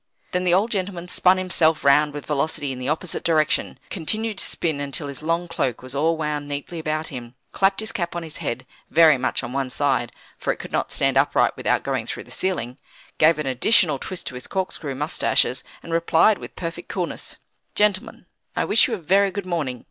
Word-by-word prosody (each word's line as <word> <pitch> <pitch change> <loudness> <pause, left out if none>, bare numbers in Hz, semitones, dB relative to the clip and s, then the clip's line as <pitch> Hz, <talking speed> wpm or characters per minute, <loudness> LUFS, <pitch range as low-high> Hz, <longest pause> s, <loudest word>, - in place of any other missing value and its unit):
Then 180 0 0
the 175 - +4
old 210 +5 +2
gentleman 185 -3 -3
spun 185 +1 +4
himself 170 -4 +2
round 150 +2 +5
with 145 0 -7
velocity 145 -1 -1
in 130 - -6
the 130 +2 -3
opposite 160 +3 -2
direction; 155 -2 +1
continued 215 +4 -1
to - - -2
spin 160 -4 -1
until 145 +1 -4
his 140 0 -5
long 165 +2 0
cloak 130 -8 -2
was 130 0 -8
all 160 +4 +1
wound 150 -2 -2
neatly 145 +4 -5
about 155 0 -2
him; 120 -2 -8 0.2
clapped 195 +1 +2
his 220 +1 -4
cap 175 -6 -3
on 170 - -3
his 160 -2 -8
head, 130 +2 -4 0.2
very 155 -4 +6
much 130 - -1
on 120 0 -5
one 135 -1 -1
side 130 -3 0 0.3
(for - - 0
it - - -4
could - - -9
not - - -1
stand - - +3
upright - - +2
without - - 0
going - - -2
through - - -5
the - - -17
ceiling), 135 -9 -2 0.4
gave 160 +1 +6
an 150 - -3
additional 150 - +4
twist 185 +5 -5
to - - -5
his 125 0 -7
corkscrew 175 -7 -3
moustaches, 135 -3 +1 0.2
and 165 - -6
replied 170 +5 +4
with - - -10
perfect 170 0 -6
coolness: 180 -3 -4 0.4
"Gentlemen, 210 +1 +1 0.3
I - - +1
wish 215 - +4
you 235 - -1
a - - -6
very 195 +4 +3
good 200 0 -5
morning. 150 -9 -2
160 Hz, 210 wpm, -23 LUFS, 140-185 Hz, 0.4 s, very